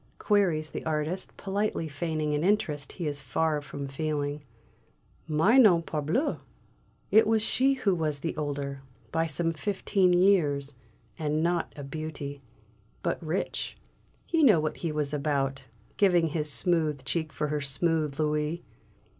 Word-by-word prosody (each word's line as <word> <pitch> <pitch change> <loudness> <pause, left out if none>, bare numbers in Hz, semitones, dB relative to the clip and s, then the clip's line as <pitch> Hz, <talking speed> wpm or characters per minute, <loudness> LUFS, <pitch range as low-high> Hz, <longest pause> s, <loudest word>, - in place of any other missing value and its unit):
queries 175 -7 +1
the - - -5
artist, 160 +4 -2
politely 200 -4 -1
feigning 155 0 -2
an 150 +1 0
interest 170 -8 0
he 175 - -5
is 145 -1 -3
far 150 +3 0
from 140 0 -6
feeling. 145 0 -2 0.9
"Mais 190 - +5
non, 175 -8 +6
parbleu! 165 - -1 0.7
It 220 0 +6
was 220 -1 +2
she 265 +4 +3
who 215 -7 +1
was 155 -4 0
the 165 - -3
older 140 -2 -3 0.3
by 165 0 +1
some 165 +2 0
fifteen 195 +1 +1
years; 160 -7 +3 0.5
and 155 0 0
not 170 0 0
a 145 - -7
beauty. 145 -1 -6 0.6
But - - -1
rich 165 +4 -3 0.5
he 330 -1 +1
knew 220 - +6
what 155 0 -2
he 165 - -2
was 150 -1 -2
about, 140 -2 -1 0.3
giving 175 -5 +4
his 150 0 -1
smooth 150 0 0
cheek 160 +2 -2
for 150 +1 -2
her 150 0 -1
smooth 150 +1 0
louis!" 150 +2 0
155 Hz, 145 wpm, -28 LUFS, 145-175 Hz, 0.9 s, non